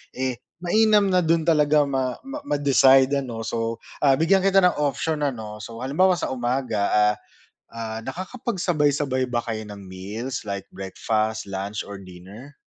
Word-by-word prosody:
Eh, 130 -2 -2 0.2
mainam 210 +3 +4
na 185 - +4
dun 165 -1 +2
talaga 150 -2 +4
ma 130 -3 -1
ma 275 +2 -6
ma-decide 135 - +4
ano, 120 -4 -5
so, 115 0 -2 0.2
ah, 140 -2 +4
bigyan 165 +6 +3
kita 195 0 +4
ng 180 -3 +3
option 150 +2 -1
ano. 110 -5 -6
So, 115 +3 -8
halimbawa 180 +8 +3
sa - - -3
umaga, 125 -3 -1
ah, 105 0 +4 0.6
ah, 110 -1 -5
nakakapagsabay-sabay 150 - -1
ba 120 - +1
kayo 110 -1 -4
ng 105 -1 -9
meals 105 +8 -5
like, 100 -1 -5
breakfast, 110 +3 -2
lunch 100 +2 -4
or 100 - -7
dinner? 95 +8 -12
130 Hz, 150 wpm, -24 LUFS, 110-155 Hz, 0.6 s, mainam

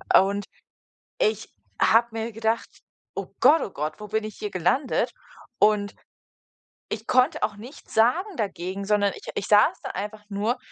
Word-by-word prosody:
und 200 +1 +4 0.7
ich 455 -3 0 0.3
habe 230 +1 +5
mir 225 +1 -4
gedacht: 225 +1 0 0.5
„Oh - - -4
Gott, 320 +2 +6
oh - - -4
Gott, 155 +1 -4
wo 210 - -7
bin 220 +1 -1
ich 215 - -8
hier 210 - -4
gelandet?“ 185 - +1 0.5
Und 210 -1 +3 1.0
ich 220 +1 -5
konnte 255 +5 +3
auch 210 -1 0
nichts 245 +7 -12
sagen 335 - +2
dagegen, 190 -1 -3
sondern 205 -1 +2
ich - - -12
ich - - -3
saß 210 0 +5
da - - -4
einfach 210 +2 -6
nur 210 +5 0
215 Hz, 155 wpm, -25 LUFS, 200-235 Hz, 1.0 s, Gott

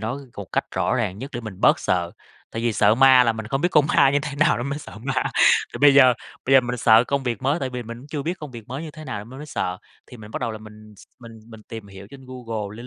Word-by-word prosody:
nó 115 +6 -3 0.2
một 100 - -6
cách - - 0
rõ - - 0
ràng 95 +2 -2
nhất 135 +4 -7
để 120 - -3
mình 105 -5 -9
bớt - - +4
sợ, 85 -2 -1 0.4
tại 115 - -5
vì 120 -1 +1
sợ 105 0 +3
ma 130 0 +6
là 115 - +2
mình 110 -1 -7
không 135 +4 -2
biết 175 - +2
con 150 -4 +4
ma 140 -2 +4
như 145 - +2
thế 145 - -5
nào 155 +1 +3
nên 120 - -4
mới 140 +1 -3
sợ 110 - -11
ma. 135 0 -1 0.5
Thì - - -6
bây 145 -1 +7
giờ 130 -3 +7 0.3
bây 135 - 0
giờ 135 - +8
mình 125 0 -4
sợ 115 0 +5
công 140 0 -1
việc 120 -2 -3
mới, 140 +5 +1
tại 130 -1 -3
vì 125 -1 -5
mình 115 +1 -9
cũng 135 - -14
chưa 150 -1 -5
biết 175 +5 -3
công 150 -3 -8
việc 115 -3 -11
mới 135 +5 -5
như 160 - -7
thế 155 +1 -11
nào 130 -7 -5
nên 115 - -15
mới 150 - -8
sợ, 90 -10 -3 0.3
thì 125 - -13
mình 105 -2 -12
bắt - - -5
đầu 120 -2 -2
là 110 - -7
mình 110 0 -14
s - - -16
mình 115 -2 -12
mình 110 -2 -13
tìm 110 -1 -9
hiểu 95 0 -12
trên 135 -1 -13
Google, 115 -5 -6
lên 120 - -9
120 Hz, 310 wpm, -22 LUFS, 110-135 Hz, 0.5 s, giờ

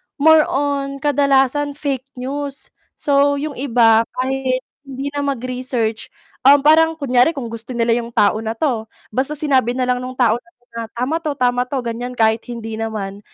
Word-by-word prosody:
more 315 +1 +5
on 275 0 -1
kadalasan 280 0 +2
fake 275 -3 -3
news, 275 +2 -5 0.2
so 285 -1 +2
yung 295 +2 -3
iba 230 -4 +4 0.2
kahit 260 0 -1 0.2
hindi 275 +1 -5
na 290 - -4
mag-research, 250 -3 -2 0.4
um, 285 0 +7
parang 320 +1 +5
kunyari 275 +1 +2
kung 240 -5 -5
gusto 230 +2 -7
nila 230 0 +1
yung 235 0 -2
tao 205 +1 +3
na 225 0 -4
'to, 230 -5 -1 0.2
basta 265 +6 -1
sinabi 265 -5 +1
nalang 250 -1 0
nung 255 +1 -6
tao 240 -2 +2
na 235 -1 -27
'to 245 - -38 0.3
tama 255 +6 0
'to, 310 -2 -2
tama 245 -1 +2
'to 275 - -2
ganyan 240 +2 -4
kahit 220 0 +3
hindi 225 -2 -6
naman, 205 -3 -4
255 Hz, 165 wpm, -19 LUFS, 235-280 Hz, 0.4 s, um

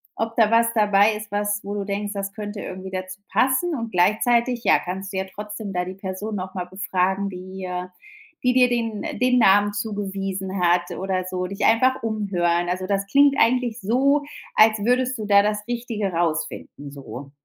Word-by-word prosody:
ob 225 0 -3
da 225 -2 +4
was 230 0 +3
dabei 210 -1 +4
ist, 210 -1 -8
was 205 0 -1
wo 200 +1 -5
du 200 -1 -3
denkst, 205 +1 -3
das 200 -1 -4
könnte 205 0 -6
irgendwie 185 0 -7
dazu 185 +1 -6
passen. 260 - +2
Und 230 -6 -4
gleichzeitig, 235 +6 +2
ja, - - +6
kannst 190 +3 -6
dir 190 0 -1
ja 190 - -13
trotzdem 210 0 -6
da 180 -1 -1
die 185 - -6
Person 195 +3 -5
noch 185 -1 -5
mal 180 -1 -3
befragen, 190 +1 -1
die 185 0 -7 0.8
die 250 0 +3
dir 255 -1 +5
den 230 -4 -2 0.2
den 250 0 +3
Namen 205 -1 +5
zugewiesen 195 -2 -3
hat 175 0 +2
oder 190 -1 -2
so, 185 0 -2
dich 200 +2 -5
einfach 255 +3 +3
umhören. 180 -6 0
Also 185 +1 -2
das 200 0 0
klingt 280 +4 +5
eigentlich 240 -1 +2
so, 275 +8 +2 0.3
als 220 0 +6
würdest 255 +1 +1
du 215 - -4
da 200 -1 +6
das 210 0 -1
Richtige 230 -5 -2
rausfinden 155 -3 -3
so. 140 -1 -9
205 Hz, 180 wpm, -23 LUFS, 190-225 Hz, 0.8 s, ja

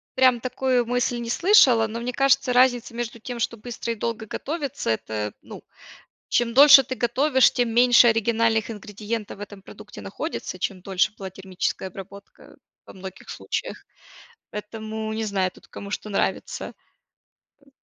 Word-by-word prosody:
прям 255 -2 +4
такую 255 0 0
мысль 245 0 0
не 235 - -5
слышала, 255 - +5
но 225 +2 -6
мне 245 +1 -4
кажется, 275 -1 +2
разница 245 -2 +3
между 235 -1 -5
тем, 245 +2 -7
что 230 0 -2
быстро 235 +1 -5
и - - -9
долго 225 0 -4
готовится 280 - -4
это, 110 -2 -2
ну, - - -11 0.7
чем 235 -1 +1
дольше 280 0 +9
ты 260 - -4
готовишь, 260 +3 +3
тем 245 -2 0
меньше 245 0 +6
оригинальных 225 0 +1
ингредиентов 210 0 -6
в - - -14
этом 205 -1 -9
продукте 210 +2 -12
находится, 195 - -6
чем 185 +1 -3
дольше 190 +1 0
была 195 - -6
термическая 190 0 -4
обработка, 200 +2 -13 0.3
во - - -13
многих 190 0 -10
случаях, - - -5 0.7
поэтому 220 +1 -6
не 220 0 -2
знаю 195 -3 0
тут - - -20
кому 200 - -9
что 210 - -5
нравится. 200 - -2 0.9
Э 275 - -23
230 Hz, 155 wpm, -24 LUFS, 205-245 Hz, 0.9 s, дольше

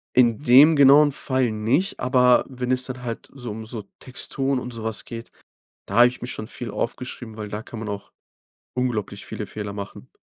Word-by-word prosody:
In 120 0 +4
dem 150 +4 +7
genauen 145 +1 +7
Fall 130 -4 0
nicht, 120 - 0
aber 125 -1 +4
wenn 125 -1 -3
es 130 0 +1
dann 130 -1 -7
halt 115 -1 -5
so 125 -5 -7
um 110 +1 -7
so 110 -3 -6 0.2
Texturen 135 +1 -2
und 125 -1 -7
so 115 -1 -7
was 110 -2 -2
geht, 115 0 -8 0.6
da 100 - -3
habe 120 +1 +9
ich 125 - -6
mich 125 - -4
schon 110 - -6
viel 120 -3 -7
aufgeschrieben, 115 0 -5
weil 105 -1 -5
da 105 +2 -5
kann 115 - -9
man 110 -2 -5
auch 100 0 -6 0.6
unglaublich 125 -5 -2
viele - - -6
Fehler 105 -1 -5
machen. 100 -1 -8
125 Hz, 200 wpm, -23 LUFS, 110-130 Hz, 0.6 s, habe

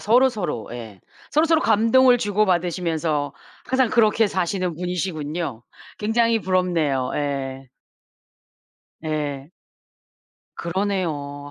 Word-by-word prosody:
서로서로 215 - +1
예. 110 -5 -9 0.3
서로서로 320 +1 +3
감동을 230 +4 +5
주고 210 -2 +1
받으시면서 165 -4 0 0.3
항상 260 -2 +2
그렇게 225 -1 +4
사시는 185 -2 -1
분이시군요. 165 -7 -3 0.4
굉장히 225 +1 +2
부럽네요. 170 -8 0
예. 135 -2 -3 1.4
예. 145 -2 -3 1.1
그러네요. 165 -6 -3
175 Hz, 235 characters per minute, -23 LUFS, 145-215 Hz, 1.4 s, 감동을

